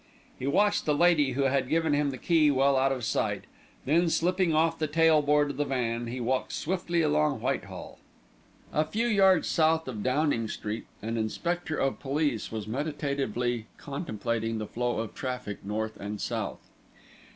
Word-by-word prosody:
He 130 - -3
watched 205 +7 +2
the 150 - +3
lady 150 -5 +4
who 140 +2 0
had 135 -1 +1
given 160 -1 +2
him 145 0 +2
the 130 - -5
key 160 -1 +3
well 140 0 +3
out 135 +1 +3
of 130 -3 -3
sight, 105 - -1 0.4
then 165 +5 +3
slipping 180 +1 +1
off 160 +1 +2
the 155 - 0
tail 160 0 +4
board 145 0 +2
of - - -9
the 145 - +2
van 120 -3 -1
he 125 +2 -4
walked 130 +2 -1
swiftly 170 -1 -1
along 150 -1 +2
Whitehall. - - -4 0.7
A 155 - +3
few 215 +9 -1
yards 195 -6 +4
south 160 -1 +2
of 110 -5 -4
Downing 130 -2 +1
Street, 105 +1 -5 0.2
an 115 +1 -2
inspector 155 +9 -2
of 135 0 0
police 140 -4 -1
was 110 -2 -4
meditatively 125 -3 -2
contemplating 115 - -3
the 110 - -3
flow 120 +2 -2
of 115 - -6
traffic 125 -6 -5
north 110 +2 -3
and 105 +1 -5
south. - - -4
140 Hz, 170 wpm, -28 LUFS, 120-160 Hz, 0.7 s, lady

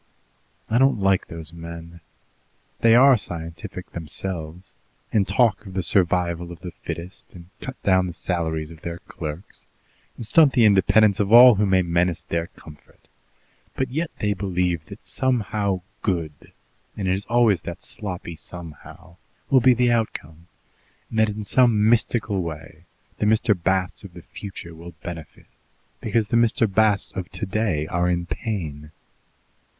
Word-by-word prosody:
"I 115 - +1
don't 135 -4 +3
like 95 -1 +2
those 80 -1 -7
men. 85 0 -9 0.8
They 115 0 +5
are 135 +2 +7
scientific 85 0 -7
themselves, 85 +1 -6 0.4
and 100 -3 +2
talk 115 -5 +2
of 95 - -10
the 95 - -1
survival 85 -2 +1
of 85 - -11
the 90 -2 -7
fittest, 85 +3 -8
and 85 0 -13
cut 135 0 -8
down 95 -1 +3
the 90 - -6
salaries 80 -2 -2
of 80 -1 -13
their 85 0 -5
clerks, 80 +1 -8 0.5
and 115 - -5
stunt 150 +4 +5
the 120 -4 +5
independence 100 0 +4
of 100 0 0
all 120 +1 +10
who 105 0 +1
may 95 -1 +3
menace 85 0 0
their 85 +1 -2
comfort, 75 -4 -17 0.7
but 130 -2 -2
yet 160 +4 -2
they 105 -1 +1
believe 90 -4 -1
that 100 - -12
somehow 105 -7 -1 0.2
good 85 -7 -3 0.5
and 100 -3 -2
it 90 - +2
is 100 +2 -3
always 115 -5 +3
that 85 - -8
sloppy 90 -4 -6
'somehow' 85 +1 -11 0.3
will 130 -2 +6
be 125 0 +5
the 120 0 +2
outcome, 85 -8 -3 0.6
and 110 - -1
that 110 0 +4
in 105 0 -5
some 110 -2 +3
mystical 110 -3 +1
way 80 0 -8 0.3
the 105 - +1
Mr. 110 0 +3
Basts 95 0 -1
of - - -12
the - - -11
future 95 -4 -9
will 85 +1 -11
benefit 80 -4 -9 0.5
because 110 -1 0
the 115 - +2
Mr. 115 -1 +3
Basts 105 -1 +2
of 95 -2 -6
today 100 -7 -1
are 85 +2 0
in 85 -1 0
pain." 75 -4 -5
95 Hz, 155 wpm, -23 LUFS, 85-110 Hz, 0.8 s, all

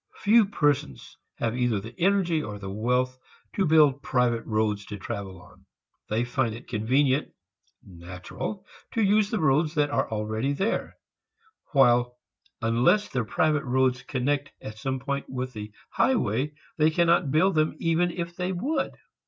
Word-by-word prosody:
Few 215 0 +5
persons 145 - -1 0.2
have 115 0 -2
either 120 -4 +1
the 110 +4 -9
energy 175 -3 +2
or 105 -6 -6
the 95 -1 -7
wealth 125 +4 0 0.3
to 195 - +1
build 150 -3 +5
private 125 -4 +1
roads 110 -2 0
to 105 - -6
travel 100 -2 -6
upon. 90 +2 -19 0.4
They 110 +3 +1
find 120 -2 -1
it 115 - -12
convenient, 130 +6 +1 0.5
"natural," 90 - -7 0.3
to 225 - +1
use 205 +1 +3
the 220 - -1
roads 155 +1 +2
that 145 -1 +1
are - - 0
already 110 +5 -2
there; 195 +10 -2 0.8
while 125 -3 +4 0.5
unless 120 - +3
their 125 -3 -1
private 150 +6 +1
roads 130 0 +1
connect 140 +2 -1
at 110 0 -9
some 130 +2 -2
point 140 +1 -4
with 130 0 -4
the 105 0 -7 0.2
high 265 - +2
way 150 - -1 0.2
they 155 +1 +5
cannot 170 -1 +2
build 160 +7 +3
them 155 0 +1
even 165 +1 +1
if 170 0 -5
they 180 +1 -2
would. 270 - -1
130 Hz, 155 wpm, -26 LUFS, 115-160 Hz, 0.8 s, Few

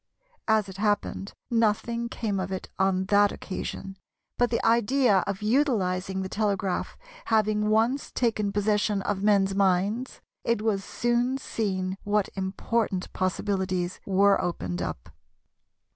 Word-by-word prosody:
As 220 -2 +3
it 190 -1 -9
happened, 205 -1 -1 0.2
nothing 230 +1 +1
came 210 -5 -2
of 190 0 -3
it 190 - -5
on 190 -1 +2
that 205 0 +5
occasion, 195 0 -6 0.4
but 245 0 +2
the 230 - -1
idea 235 -1 +4
of 200 +1 -3
utilising 195 -7 +1
the - - -3
telegraph 200 -2 -1 0.3
having 215 -1 +2
once 230 +6 +1
taken 215 -4 0
possession 205 0 +1
of 200 -2 -1
men's 200 -2 +3
minds, 200 +5 +1 0.2
it 230 -2 0
was 205 -3 0
soon 240 +4 0
seen 190 -7 -2
what 205 -1 +1
important 190 +1 -2
possibilities 185 -1 -1
were 200 +1 +4
opened 90 - -3
up. - - -5
205 Hz, 130 wpm, -27 LUFS, 190-225 Hz, 0.4 s, that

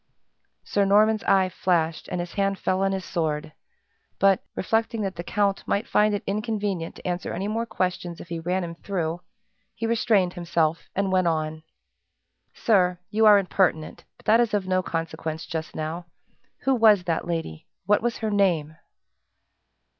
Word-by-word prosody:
Sir 200 - +1
Norman's 210 +2 +4
eye 190 -1 +4
flashed, 170 -3 0
and 180 - -3
his 175 0 -5
hand 195 -1 0
fell 185 0 0
on 195 0 +2
his 190 -1 -3
sword; 155 -3 -2 0.6
but, 195 -1 +3
reflecting 225 +2 0
that 195 -1 -3
the 170 - -5
count 200 +1 0
might 205 +3 0
find 210 0 +3
it 200 - -4
inconvenient 205 -4 -2
to - - -8
answer 180 0 -2
any 190 +4 -3
more 225 +2 -2
questions 180 -3 -2
if 170 - -11
he 170 -1 -3
ran 180 +3 -1
him 170 -1 -5
through, 170 -1 -3 0.5
he 230 - -3
restrained 215 -5 +2
himself 170 -2 -1
and 195 0 0
went 185 -2 +3
on. 155 -1 -1 0.9
"Sir, 180 -5 +2
you 220 +1 +4
are 210 -1 +9
impertinent, 180 -4 0
but - - -23
that 220 +2 +5
is 235 -3 +2
of 200 -2 -1
no 185 0 +2
consequence, 160 -2 -4
just 160 -1 -5
now. 160 +3 -4 0.6
Who 270 - +3
was 220 -6 +5
that 170 0 -2
lady 165 - -4 0.2
what 205 +2 +3
was 240 0 -1
her 220 -2 -2
name?" 170 -7 +1
185 Hz, 170 wpm, -25 LUFS, 170-205 Hz, 0.9 s, are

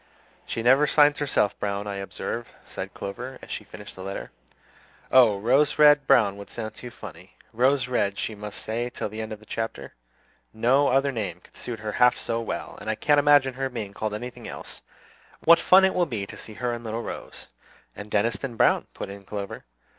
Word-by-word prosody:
"She 115 - -3
never 135 +5 +5
signs 145 0 +4
herself 135 -8 +1
Browne, 100 0 -2
I 100 -1 -4
observe," 110 +4 -5
said - - -7
Clover, 125 +6 -6
as - - -10
she - - -4
finished - - -11
the 95 - -9
letter. 95 +1 -6 0.8
"Oh, 120 -6 +6
Rose 130 +8 +3
Red 145 -2 +6
Browne 100 -4 +4
would 100 - -10
sound 110 -2 -6
too 125 - -8
funny. - - -12 0.2
Rose 130 +3 +2
Red 100 -6 0
she 110 - -3
must 105 0 -7
stay 120 +2 -2
till 115 - -4
the 110 +2 -6
end 110 - -6
of 110 - -6
the 110 - -18
chapter; 110 -13 -5 0.6
no 130 +6 +3
other 135 +2 +2
name 100 -8 -4
could - - -21
suit 115 -3 -5
her 110 -1 -3
half 125 +3 +4
so 115 0 -2
well, 115 - -5
and - - -5
I 110 - +1
can't 145 +5 +3
imagine 145 -2 +5
her 135 +1 -2
being 110 -5 -6
called 105 0 -3
anything 120 +3 -7
else. - - -8 0.6
What 170 +1 +7
fun 190 +2 +6
it 190 - +2
will 175 -1 +1
be 110 -7 -3
to - - -10
see 110 - -9
her 125 +1 -2
and 120 0 -6
little 115 +1 -4
Rose!" - - -8 0.5
"And 105 +1 -8
Deniston 115 +4 0
Browne," - - +3
put - - -5
in 100 0 -10
Clover. 100 0 -6
115 Hz, 205 wpm, -25 LUFS, 105-135 Hz, 0.8 s, What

